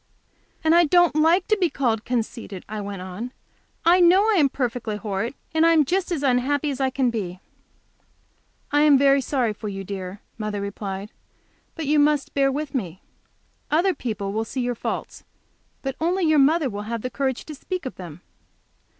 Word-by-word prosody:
"And 320 0 +4
I 345 0 +6
don't 350 0 +4
like 330 +4 +3
to 430 - +3
be 355 - +3
called 230 -7 -1
conceited," 230 -5 -4
I 215 0 -5
went 200 -2 -6
on. 190 +7 -6 0.6
"I 350 +2 +6
know 360 +3 +6
I 425 - +3
am 285 -3 +4
perfectly 245 -5 -2
horrid, 210 +4 -3 0.2
and 320 0 +3
I 330 0 +6
am 310 -3 +4
just 370 +5 -1
as 310 -5 -1
unhappy 280 +3 +1
as 270 0 -4
I 265 - +2
can 260 -2 0
be." 185 -5 -4 1.3
"I 290 0 +3
am 295 -2 +6
very 275 0 +4
sorry 250 -4 0
for 210 0 -6
you, 195 -1 -5
dear," 190 0 -6 0.2
mother 210 -1 -3
replied. 200 0 -5 0.6
"But 320 - -4
you 300 +1 +3
must 295 -1 +2
bear 275 -1 +2
with 290 0 -4
me. 190 - -4 0.7
Other 350 +5 +3
people 210 - -4
will 220 +1 0
see 255 +3 -4
your 245 0 -1
faults, 230 - -5 0.6
but 270 -1 -3
only 355 +2 +1
your 310 -2 +4
mother 300 +2 +4
will 205 -2 -6
have 230 -2 -3
the 255 - -3
courage 265 -2 -2
to 310 - -8
speak 355 +3 -5
of 260 - -4
them. 175 -2 -9
265 Hz, 190 wpm, -23 LUFS, 215-305 Hz, 1.3 s, I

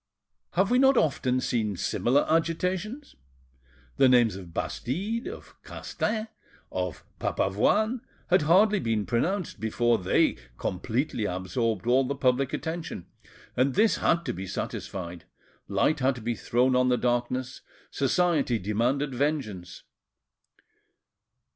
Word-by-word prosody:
Have 190 +4 +2
we 250 - +4
not 270 -1 +5
often 130 - +1
seen 110 -6 -1
similar 130 +10 +1
agitations? 180 - -1 0.8
The 135 -1 +6
names 120 -5 +4
of 90 -3 -9
Bastide, 200 - -3
of - - -9
Castaing, 215 0 -3 0.4
of 90 -3 -3 0.2
Papavoine, 215 - +1 0.3
had 185 - +5
hardly 195 +7 +4
been 110 - -1
pronounced 175 +10 -1
before 115 +1 +1
they 90 -7 +2 0.2
completely 115 - -2
absorbed 95 +3 -2
all 125 +3 +4
the 140 +2 -2
public 130 0 +1
attention, 160 - -4 0.5
and 130 +2 +2
this 215 +3 +4
had 170 0 +1
to - - -2
be 95 +2 -6
satisfied, 90 -2 -5 0.4
light 155 - +1
had 130 0 +2
to 120 - -9
be 120 +2 -1
thrown 125 +3 +1
on 125 0 +3
the 125 - +3
darkness: 125 +1 -1 0.3
society 145 -3 +1
demanded 120 +8 0
vengeance. 120 - -2
130 Hz, 120 wpm, -27 LUFS, 110-165 Hz, 0.8 s, The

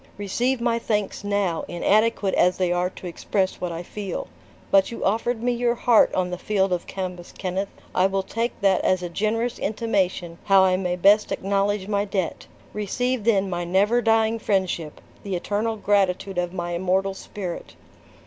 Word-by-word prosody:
"Receive 240 +6 0
my 235 -1 +1
thanks 210 -3 -2
now, 200 -5 0
inadequate 205 +2 +2
as 180 0 +3
they 180 -2 +1
are 180 +1 +1
to 185 - -12
express 185 +2 -2
what 180 -1 -2
I 170 +1 -5
feel. 195 0 -5 0.5
But 195 -1 +5
you 235 - -5
offered 225 +3 0
me 245 - +2
your 240 0 +1
heart 235 -1 +4
on 180 -1 0
the 180 - -4
field 195 -3 +1
of 175 - -3
Cambus 180 -2 -5
Kenneth; 190 +1 -3 0.2
I 185 +1 +4
will 195 0 -1
take 230 +4 -3
that 195 -2 +3
as 185 -1 +2
a 175 - -3
generous 225 +6 -1
intimation 190 -6 -1
how 195 -1 +6
I 185 -1 +4
may 180 -1 -1
best 200 +4 +4
acknowledge 200 0 0
my 200 -1 +1
debt. 195 -4 -3 0.3
Receive 235 +3 -1
then 200 -4 +3
my 175 -2 -2
never 200 +7 +2
dying 225 0 +2
friendship, 185 -7 -1 0.2
the 195 -2 -3
eternal 210 +5 -1
gratitude 195 -2 +1
of 175 -1 -1
my 175 -1 -4
immortal 190 +2 0
spirit." 190 -2 -7
195 Hz, 175 wpm, -24 LUFS, 180-215 Hz, 0.5 s, how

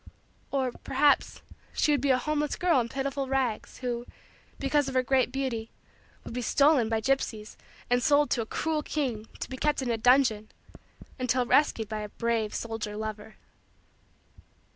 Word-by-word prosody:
Or, 265 -2 0
perhaps, 280 +4 +1 0.3
she 300 - +2
would 285 -3 +2
be 280 - +1
a 260 - +5
homeless 300 +2 -1
girl 350 -6 +3
in 235 -1 -2
pitiful 275 +1 -2
rags 260 -4 -1
who, 240 0 -3 0.5
because 285 +1 +1
of 265 - -4
her 255 - +3
great 260 0 +2
beauty, 245 -5 -3 0.5
would - - -8
be 250 - -2
stolen 275 -1 +3
by 225 -1 +1
gypsies 220 -4 -1 0.3
and 245 0 +2
sold 295 +1 +3
to 240 - +2
a 220 - -5
cruel 315 +4 -1
king 250 -9 -3
to - - -4
be 260 - -7
kept 300 +2 +1
in 245 - -1
a 225 - -1
dungeon 235 -3 +3 0.7
until 255 0 +1
rescued 235 -4 +2
by 215 0 -4
a 210 - -6
brave 230 -1 -1
soldier 225 -2 -4
lover. 215 0 -6
255 Hz, 165 wpm, -28 LUFS, 225-275 Hz, 0.7 s, a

